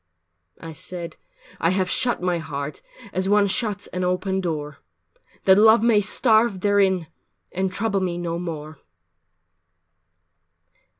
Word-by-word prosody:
IV - - -18
I 165 - -7
said, 170 +2 -7 0.4
"I 165 - +2
have 185 0 +1
shut 240 +1 0
my 180 -2 0
heart 145 -2 -6 0.3
As 185 +1 -1
one 205 0 +4
shuts 205 0 -1
an 180 0 -3
open 190 +1 -1
door, 150 -5 -4 0.7
That 190 +1 +6
Love 220 +1 +6
may 225 -3 +4
starve 220 -1 +2
therein 195 -3 +2 0.5
And 190 +1 -1
trouble 200 +1 -1
me 180 -2 -2
no 170 -1 -3
more." 155 -4 -6
185 Hz, 130 wpm, -23 LUFS, 170-205 Hz, 0.7 s, That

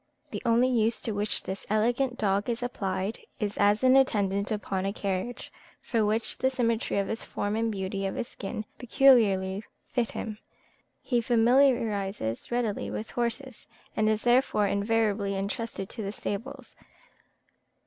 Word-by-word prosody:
The - - -4
only 235 +2 +4
use 230 -2 +1
to 225 - -1
which 205 0 0
this 190 +1 -6
elegant 240 +4 +1
dog 200 +1 +1
is 235 +1 -2
applied 195 -3 -2 0.2
is 210 -3 -2
as 205 +3 +3
an 260 0 +6
attendant 200 -7 +2
upon 195 -3 -2
a 195 - 0
carriage, 200 +4 -4 0.3
for 230 -3 0
which 215 +2 -1
the 260 - +3
symmetry 230 -5 0
of 200 -1 +1
his 225 - -3
form 205 +1 -3
and 225 0 0
beauty 195 -1 -2
of 190 - -4
his 235 - -3
skin 210 +2 -6
peculiarly 215 -7 +4 0.3
fit 240 -3 0
him. 215 -1 -5 0.6
He 240 -2 +1
familiarises 225 - +2
readily 225 - -1
with 105 +1 -5
horses, 240 +1 -3 0.3
and 215 0 +2
is 215 0 0
therefore 240 -4 +3
invariably 200 0 +1
entrusted 200 0 -3
to 230 - -6
the 200 -1 -3
stables. 240 +6 -6
215 Hz, 150 wpm, -28 LUFS, 200-240 Hz, 0.6 s, an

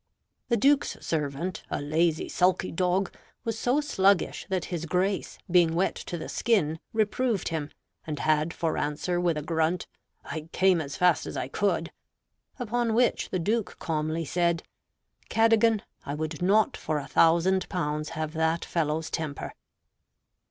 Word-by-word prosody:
The 235 - +3
Duke's 280 +6 +3
servant, 155 +3 -2
a - - -2
lazy, 155 +3 +1
sulky 185 +1 +1
dog, 180 +2 +1 0.3
was 225 -1 -3
so 260 +5 +2
sluggish 200 -10 +2
that 185 -2 -1
his 170 -1 -3
Grace, 185 +4 0
being 170 -2 +4
wet 185 +3 +2
to 175 - -6
the 160 - -6
skin, 160 -9 +1
reproved 220 0 0
him, 155 -3 -3 0.4
and 150 -2 -3
had 155 +2 +1
for 165 -1 -1
answer 160 +4 -1
with 170 -3 +1
a 150 - -3
grunt, 160 +2 0 0.4
"I 160 0 -6
came 185 -3 +4
as 140 -2 -6
fast 180 -3 +3
as - - -5
I 130 - -3
could;" 175 -1 0 0.7
upon 240 -2 0
which 245 +1 +2
the - - -1
Duke 210 +3 -1
calmly 160 0 -2
said, 170 +1 +1 0.7
"Cadogan, 225 -1 +4 0.2
I 140 - -4
would 155 +1 -4
not 205 +4 +3
for 155 - -2
a 145 - -4
thousand 170 +6 +3
pounds 150 -3 -2
have 155 -1 -3
that 160 +1 0
fellow's 160 -1 -1
temper." 155 -3 -4
170 Hz, 150 wpm, -27 LUFS, 155-195 Hz, 0.7 s, being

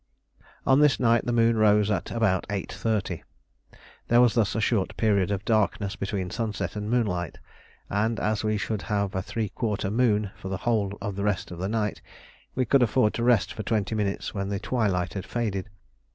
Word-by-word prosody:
On 135 +2 +5
this 150 -2 +4
night 115 -1 +3
the - - +1
moon 115 -1 +3
rose 105 -1 +4
at 100 - -1
about 110 -6 +1
8.30; 100 -2 -2 0.9
there 120 - +5
was 120 -2 +5
thus 115 -3 +1
a - - +1
short 105 -3 0
period 100 -4 +2
of 100 -1 -2
darkness 105 -2 +1
between 95 -2 -3
sunset 110 -4 -3
and 105 0 -4
moonlight, 90 -9 0 0.5
and 110 +3 0
as 105 0 0
we 110 0 +1
should 105 0 -2
have 100 -2 0
a 95 - -1
three 110 +2 -3
quarter 105 -2 -2
moon 105 -4 +2
for 95 - -8
the 95 - -2
whole 105 -4 +1
of 100 -1 -3
the 100 - -2
rest 100 -4 -1
of 85 - -7
the 95 +2 -2
night, 105 -2 -1 0.5
we 130 - +1
could 135 +3 +4
afford 110 -1 +3
to 120 - -2
rest 120 -4 +3
for - - -5
twenty 110 0 -1
minutes 105 -2 -2
when 100 -1 -3
the 100 - -1
twilight 100 -7 0
had 95 - -5
faded. 105 -5 -2
105 Hz, 195 wpm, -26 LUFS, 100-115 Hz, 0.9 s, On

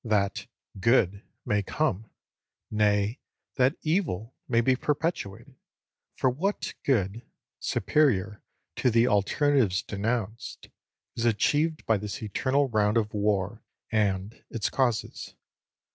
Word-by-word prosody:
That 105 -4 0 0.3
"good" 100 -2 +3 0.2
may 105 0 +1
come! 110 -2 -1 0.6
nay, 105 +2 +2 0.4
that 130 +4 +3
evil 155 - -1
may 115 -2 +3
be 130 +2 +3
perpetuated; 135 - -2 0.6
for 130 - +2
what 190 +11 -2
good, 110 -4 +1 0.4
superior 105 -9 +1 0.4
to 125 - +3
the 115 +1 +4
alternatives 105 -2 +2
denounced, 110 +1 -3 0.5
is 115 - -1
achieved 150 +8 +1
by 110 - +3
this 105 +2 -5
eternal 135 +7 +1
round 105 -2 +2
of 105 -2 0
war 105 0 0 0.3
and 105 -1 0
its 110 -3 -2
causes? 120 -5 -1
110 Hz, 110 wpm, -27 LUFS, 105-130 Hz, 0.6 s, the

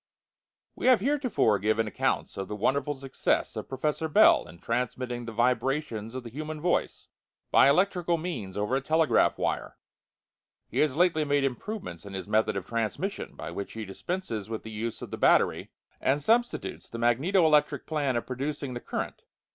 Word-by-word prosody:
We - - -2
have 255 -3 +7
heretofore 255 - +2
given 110 +3 +1
accounts 105 - -1
of 95 - -4
the 105 - -4
wonderful 140 +7 0
success 135 0 -1
of - - -6
Professor 150 +4 -1
Bell 155 - +5
in 85 - -13
transmitting 120 +3 -2
the 115 - -5
vibrations 120 -1 0
of 130 - -4
the 115 - -9
human 155 +3 -5
voice 175 +3 -1 0.4
by 135 - +7
electrical 175 +1 +2
means 155 - -5
over 105 +5 0
a 135 - +1
telegraph 160 +2 +3
wire. - - -2 0.9
He - - -3
has 150 -3 +2
lately 165 -2 +3
made 145 -1 +1
improvements 135 - -4
in 100 -1 -8
his 95 -1 -5
method 110 0 +2
of 95 - -4
transmission, 115 - -3
by - - -6
which 100 - -6
he 110 -1 -5
dispenses 110 - -4
with 110 -1 -4
the 110 - -8
use 110 +1 -4
of - - -8
the - - -4
battery, - - +3 0.3
and 135 +2 +2
substitutes 235 +9 0
the 115 - -6
magneto 140 +11 +3
electric 150 -2 +3
plan 145 -5 0
of 120 - -1
producing 140 +1 -4
the 120 - -5
current. - - -4
130 Hz, 175 wpm, -28 LUFS, 110-155 Hz, 0.9 s, have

